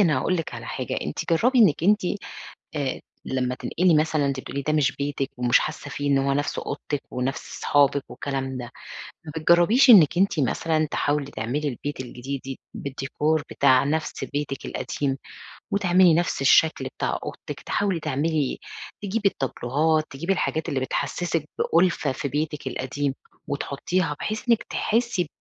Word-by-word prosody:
أنا 155 -9 +4
هاقول 185 +7 0
لِك 165 - -4
على - - -7
حاجة، - - -3
أنتِ - - -4
جرّبي 250 +10 +3
إنِك 190 - +5
أنتِ 210 +2 +5 0.8
آآ 140 -3 -2 0.2
لما 125 -1 -1
تنتقلي 175 +4 +1
مثلًا 155 -1 +2
أنتِ 135 -1 -1
بتقولي 140 +1 -5
ده 155 +3 -1
مش 140 -4 +2
بيتِك 140 -1 -2
ومش 120 -1 +4
حاسة 150 -1 -4
فيه 145 +1 -3
إن 140 - +4
هو 135 0 +1
نَفْس 145 +2 -1
أوضتِك 145 -2 -4
ونَفْس 125 +2 -4
صحابِك 140 -1 +3
والكلام 135 -2 -4
ده، 120 -1 -6 0.6
ما 150 - -8
بتجربيش 175 - +5
إنِك 175 - +8
أنتِ 190 -5 +2
مثلًا 155 +4 +1
تحاولي 145 -1 0
تعملي 130 +7 -2
البيت 140 +2 -5
الجديد 130 +2 -5
دي 135 -1 -6 0.2
بالdecor 140 +3 -1
بتاع 130 -1 +4
نَفْس 155 +2 -2
بيتِك 145 -2 -4
القديم، 135 -2 -2 0.5
وتعملي 185 -3 +4
نَفْس 170 -3 0
الشكل 155 +3 +4
بتاع - - -1
أوضتِك، - - -7
تحاولي 195 -4 -1
تعملي 150 -1 0 0.4
تجيبي 205 0 +1
التابلوهات، 155 +3 0
تجيبي 165 +8 -1
الحاجات 160 -4 -1
اللي 135 - 0
بتحسسِك 155 +4 -1
بألفة 170 -4 +2
في 140 - -3
بيتِك 150 0 -3
القديم، 135 +2 -2 0.3
وتحطيها 145 +3 -1
بحيث 215 +3 -4
إنِك 230 -2 +4
تحسي 230 -5 0
ب - - -13
145 Hz, 155 wpm, -24 LUFS, 135-170 Hz, 0.8 s, إنِك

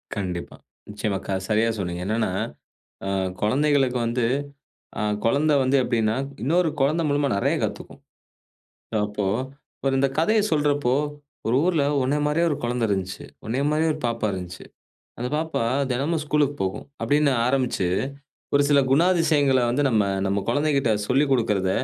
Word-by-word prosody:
கண்டிப்பா, 90 -4 -4 0.3
நிச்சயமா. 105 -1 -2
க - - -3 0.2
சரியா 110 +2 +2
சொன்னீங்க. 90 -1 -3
என்னன்னா 110 +1 0 0.8
அ - - -2 0.3
குழந்தைகளுக்கு 135 +1 +2
வந்து 120 0 0 0.8
அ - - 0 0.2
குழந்த 145 +6 +3
வந்து 130 +2 +2
எப்டீன்னா, 115 -2 +1 0.3
இன்னொரு 165 +5 +2
குழந்தை 155 +5 +2
மூலமா 145 0 +1
நெறைய - - +1
கத்துக்கும். - - -5 1.1
அப்போ, 105 0 -4 0.5
இப்ப 135 - -1
இந்த 135 +1 +3
கதைய 215 +7 +3
சொல்றப்போ, 145 -4 +2 0.5
"ஒரு 120 - +2
ஊர்ல 165 -6 +2 0.2
உன்னைய 145 +3 0
மாரியே 165 +3 +2
ஒரு 145 - -1
குழந்த 120 0 -1
இருந்துச்சு. 95 -2 -3 0.2
உன்னைய 125 +6 -1
மாரியே 160 +1 +2
ஒரு 155 - -7
பாப்பா 115 -2 -1
இருந்துச்சு. 90 -1 -7 0.5
அந்த 125 +1 -2
பாப்பா 160 -6 -1 0.3
தினமும் 150 +5 -1
ஸ்கூல்க்கு 145 -1 +1
போகும்." 95 0 -3 0.2
அப்படீன்னு 145 -1 +3
ஆரம்பிச்சு, 125 -8 +1 0.7
ஒரு 145 - +5
சில 140 -1 +5
குணாதிசயங்கள 155 -5 +3
வந்து 145 +4 +1
நம்ம 110 -3 +3 0.2
நம்ம 100 0 0
குழந்தைகிட்ட 140 -2 +2 0.2
சொல்லிக் 135 +2 +2
குடுக்குறத, 105 -7 +1
135 Hz, 140 wpm, -24 LUFS, 110-150 Hz, 1.1 s, ஒரு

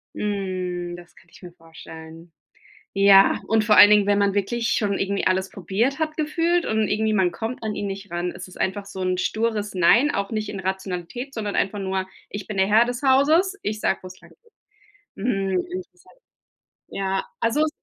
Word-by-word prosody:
Hm. 185 -4 -3
Das 175 0 -14
kann 170 - -22
ich - - -17
mir 180 -2 -10
vorstellen. 165 0 -13 0.6
Ja 195 0 +6
und 220 -1 +2
vor 210 0 +4
allen 205 - +10
Dingen, 210 -1 +5
wenn 205 0 +3
man 200 -1 +2
wirklich 225 +4 -1
schon 200 -2 0
irgendwie 200 0 -1
alles 190 +1 0
probiert 210 - -1
hat 310 -1 -2
gefühlt, 330 +3 0
und 220 -1 0
irgendwie 220 0 0
man 190 -4 +2
kommt 225 +7 -5
an 215 -1 -3
ihn 205 - -3
nicht 195 0 -7
ran, 175 +1 -2
es 180 - -9
ist 185 - -14
einfach 195 +1 -2
so 195 -1 -8
'n 185 0 0
stures 215 +1 -1
Nein, 235 +11 +4
auch 200 -5 -3
nicht 215 -1 -3
in 195 - -5
Rationalität, 190 +6 -5
sondern 210 -4 -4
einfach 200 +2 0
nur: 190 -1 -2 0.2
„Ich 205 -1 -7
bin 210 - -5
der 190 0 +3
Herr 220 +3 +5
des 245 +2 -5
Hauses. 310 +9 +3
Ich 215 +1 -3
sage 195 - 0
wo 185 - -9
es 185 0 -13
langgeht.“ - - -20 0.8
Mhm, 195 -4 -1
interessant. 370 +6 -10 0.7
Ja, 195 0 -2 0.2
also 230 +6 +1
es 310 - +2
200 Hz, 195 wpm, -23 LUFS, 190-225 Hz, 0.8 s, allen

